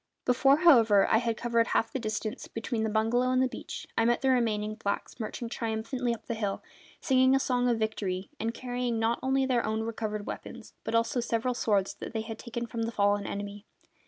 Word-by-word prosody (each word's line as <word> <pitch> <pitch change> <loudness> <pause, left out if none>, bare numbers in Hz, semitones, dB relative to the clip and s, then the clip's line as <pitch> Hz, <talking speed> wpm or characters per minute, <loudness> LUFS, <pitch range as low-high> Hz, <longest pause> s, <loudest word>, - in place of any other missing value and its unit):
Before, 270 +3 +4
however, 225 - +6
I - - +4
had 230 -2 -1
covered 235 -1 +1
half 225 - 0
the 265 - -1
distance 215 +1 -4
between 225 0 -3
the 220 - 0
bungalow 225 +4 +2
and 255 0 +2
the 260 - +3
beach 255 - -7
I 225 - +3
met 240 +1 +2
the 265 - +3
remaining 215 -4 +1
blacks 215 +2 -4
marching 230 +2 -4
triumphantly 230 +2 -2
up 230 - -5
the - - -2
hill, 205 -3 -3 0.4
singing 260 -2 +4
a - - +3
song 250 -2 +1
of 235 - +2
victory, 200 -4 -2
and 225 +1 -1
carrying 245 -1 -2
not 225 +1 +1
only 265 +1 +2
their 250 -3 +1
own 220 +1 -1
recovered 215 -2 -3
weapons - - -8
but 225 - -2
also 230 +2 +2
several 235 +1 0
swords 205 -5 +1
that 200 - -8
they 220 - -1
had 220 0 -7
taken 235 0 -4
from 230 0 -5
the 230 0 -1
fallen 205 -1 +1
enemy. 205 +1 -6
230 Hz, 210 wpm, -29 LUFS, 215-245 Hz, 0.4 s, however